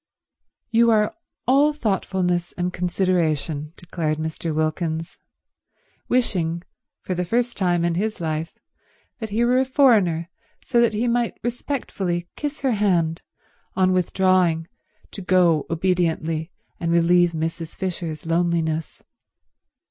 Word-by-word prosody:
"You 235 0 +5
are 210 -2 +2 0.3
all 280 +4 +4
thoughtfulness 190 - -1
and 180 0 -2
consideration," 165 -5 0
declared 165 -3 -2
Mr. 160 +1 -3
Wilkins, 160 +1 -2 0.9
wishing, 175 -9 0 0.4
for 185 - -3
the 180 0 -1
first 235 +6 0
time 175 -3 +1
in 170 - +1
his 210 +4 -2
life, 160 0 -3 0.6
that 220 -2 -4
he 225 +4 +1
were 250 +1 +3
a - - +4
foreigner 220 - +3 0.4
so 240 -2 +3
that 235 -2 +2
he 230 +3 0
might 240 0 0
respectfully 205 -8 -3
kiss 295 -1 -4
her 270 -2 +2
hand 175 -7 +1 0.5
on 185 0 +3
withdrawing 180 -2 +2 0.4
to 200 - -7
go 180 -5 +3
obediently 165 -2 0 0.3
and 170 -1 -1
relieve 170 0 +4
Mrs. 165 +1 -4
Fisher's 170 -5 -4
loneliness. 165 -1 -1
180 Hz, 120 wpm, -23 LUFS, 165-215 Hz, 0.9 s, You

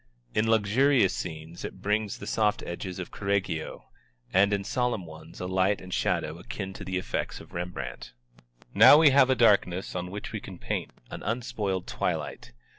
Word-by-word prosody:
In 110 +1 +1
luxurious 115 0 +3
scenes 80 0 -6
it 95 - -7
brings 105 0 0
the - - -8
soft 105 -2 +1
edges 90 +1 -5
of 90 - -6
Correggio, 100 -5 -2 0.4
and 100 +2 +5
in 100 -1 0
solemn 125 -4 -1
ones 80 0 -12
a 90 - -4
light 95 +2 +1
and 90 0 -8
shadow 80 +2 -1
akin 95 -2 -6
to 100 - -8
the 95 -1 -2
effects 90 - -3
of - - -14
Rembrandt. 90 -6 -6 0.6
Now - - +9
we 155 -2 +7
have 135 -1 +5
a 130 - +4
darkness 100 -6 +3
on 90 0 -4
which 105 +3 -6
we - - -3
can - - -10
paint, - - -3 0.2
an - - -6
unspoiled 110 -5 -2
twilight. - - -3
100 Hz, 175 wpm, -28 LUFS, 90-110 Hz, 0.6 s, Now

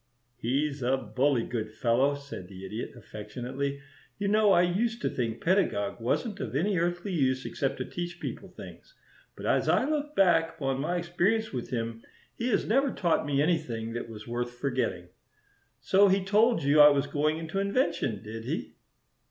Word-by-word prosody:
"He's 140 +4 -1
a 130 +2 +2
bully 125 +2 +1
good 115 -3 -3
fellow," 120 +5 +2
said 140 -10 -8
the 95 0 -10
Idiot, 110 +5 -5
affectionately. 125 +6 -5 0.4
"You 200 0 -1
know 210 0 +4
I 175 - +6
used 225 +7 0
to - - +1
think 115 -3 -3
Pedagog 165 - +1
wasn't 200 - -1
of 125 -2 -4
any 185 +5 +1
earthly 175 +3 -1
use 130 -4 +1
except 135 -1 -2
to - - -3
teach 175 0 -5
people - - -6
things, - - -12 0.4
but - - -8
as - - +2
I - - +3
look 300 0 -2
back 165 -4 +3
upon 135 -3 -1
my 175 +5 -1
experience 175 +5 0
with 125 -2 -4
him 115 -2 -3 0.3
he 235 - -3
has - - +1
never 270 +5 +2
taught 170 -5 0
me 140 0 +2
anything 125 -9 -1
that 120 0 -5
was 105 0 -9
worth 120 +1 -3
forgetting. 120 -10 -2 0.7
So 200 +1 +5
he 190 0 +2
told 215 +2 +3
you 145 +2 +4
I 150 0 +10
was 140 -1 +2
going 150 +2 0
into 165 +4 -3
invention, 195 - 0
did 110 +1 -7
he?" - - -4
145 Hz, 175 wpm, -28 LUFS, 120-185 Hz, 0.7 s, I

